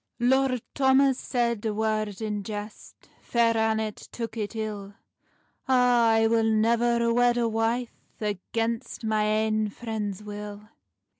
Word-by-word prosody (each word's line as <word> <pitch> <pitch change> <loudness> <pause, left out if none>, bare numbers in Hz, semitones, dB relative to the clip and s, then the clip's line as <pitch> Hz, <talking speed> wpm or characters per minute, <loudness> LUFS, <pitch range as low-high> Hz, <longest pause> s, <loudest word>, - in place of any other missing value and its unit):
Lord 255 0 +2
Thomas 265 -1 +3
said 235 -4 -1
a 215 -2 -1
word 215 -1 -1
in 210 -1 -2
jest, 210 +1 -8
Fair 230 -1 +2
Annet 220 -1 0
took 230 -1 -5
it 215 0 -4
ill: 205 -2 -5 0.7
"A, 265 - +2
I 235 -3 +4
will 225 0 +2
nevir 235 +2 +2
wed 245 0 +3
a 235 -1 +2
wife 230 +2 -1 0.3
Against 225 +3 -3
my 215 -1 +1
ain 215 0 +1
friend's 210 -2 -5
will." 210 0 -8
225 Hz, 130 wpm, -26 LUFS, 215-235 Hz, 0.7 s, I